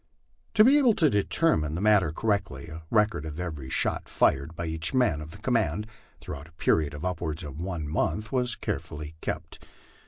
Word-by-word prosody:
To 215 - +8
be 275 +5 +6
able 245 -6 +4
to 155 -3 +3
determine 100 - +2
the - - -2
matter 100 -6 +4
correctly, 100 -8 -1
a 80 +1 -8
record 105 -7 +2
of 80 0 -6
every 75 -7 -5
shot - - -1
fired 70 +4 +1
by 85 - -4
each 80 +6 0
man 120 - +2
of 75 - -8
the 80 - -10
command, 110 -1 0 0.4
throughout 70 +1 -7
a - - -24
period 75 -2 +1
of 75 - -6
upwards 85 -2 -2
of 75 +1 -7
one 85 -4 -3
month, 105 +8 -1
was 125 -2 0
carefully 75 +1 -5
kept. - - -5
85 Hz, 185 wpm, -27 LUFS, 75-110 Hz, 0.4 s, To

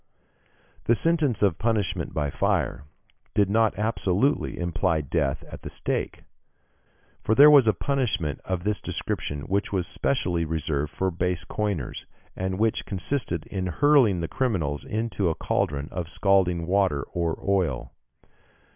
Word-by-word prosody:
The 120 - +4
sentence 150 -8 +2
of 90 -6 +2
punishment 110 -5 -1
by 75 -2 -2
fire 70 +1 0 0.5
did 100 -1 +3
not 110 0 +2
absolutely 110 +4 0
imply 85 -1 0
death 70 -1 -1
at - - -11
the - - -7
stake, - - -3 1.0
for 110 - +1
there 145 +4 +9
was 140 -6 +7
a 110 - +5
punishment 105 - -1
of 95 -2 -3
this 105 0 0
description 75 0 -3
which 100 +7 -1
was 95 -3 0
specially 90 -11 0
reserved 75 -2 -2
for 95 +2 -1
base 90 0 -1
coiners, 100 - -3 0.3
and 95 0 -2
which 110 +1 0
consisted 95 - -2
in 95 -2 -3
hurling 120 - +4
the 85 - -2
criminals 80 - -1
into 105 -4 -1
a 80 - -1
cauldron 70 0 -1
of 85 -2 -4
scalding 90 -4 +2
water 90 -6 +1
or 85 -2 -1
oil. 90 -10 0
95 Hz, 140 wpm, -25 LUFS, 80-110 Hz, 1.0 s, there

